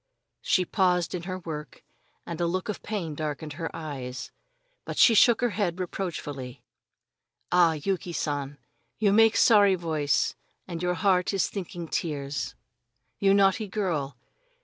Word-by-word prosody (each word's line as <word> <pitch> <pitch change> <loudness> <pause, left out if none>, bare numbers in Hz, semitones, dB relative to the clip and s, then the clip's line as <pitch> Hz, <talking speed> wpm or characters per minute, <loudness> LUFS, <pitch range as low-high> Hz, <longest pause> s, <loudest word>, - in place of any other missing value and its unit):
She 185 - +2
paused 180 -2 +1
in 180 - -3
her 185 - -3
work, 155 -5 -7 0.4
and 170 0 -5
a 170 - +2
look 185 +4 -2
of 210 - -4
pain 190 -8 -4
darkened 150 0 -4
her 165 +2 -4
eyes, 130 -5 -6 0.5
but - - -6
she 235 - +7
shook 235 +2 +5
her 245 -2 +2
head 185 -3 -1
reproachfully. 145 -8 -5 0.9
"Ah, 175 -2 +5
Yuki 175 +3 -2
San, 145 -3 -3 0.4
you 205 -2 +3
make 225 +1 +5
sorry 205 -4 +6
voice 155 -5 0 0.3
and 170 -2 -5
your 180 0 0
heart 185 +2 +2
is 190 - +2
thinking 175 -3 -6
tears. 140 -6 -3 0.6
You 195 0 +4
naughty 200 +2 +3
girl! 165 - -2
175 Hz, 145 wpm, -27 LUFS, 150-195 Hz, 0.9 s, she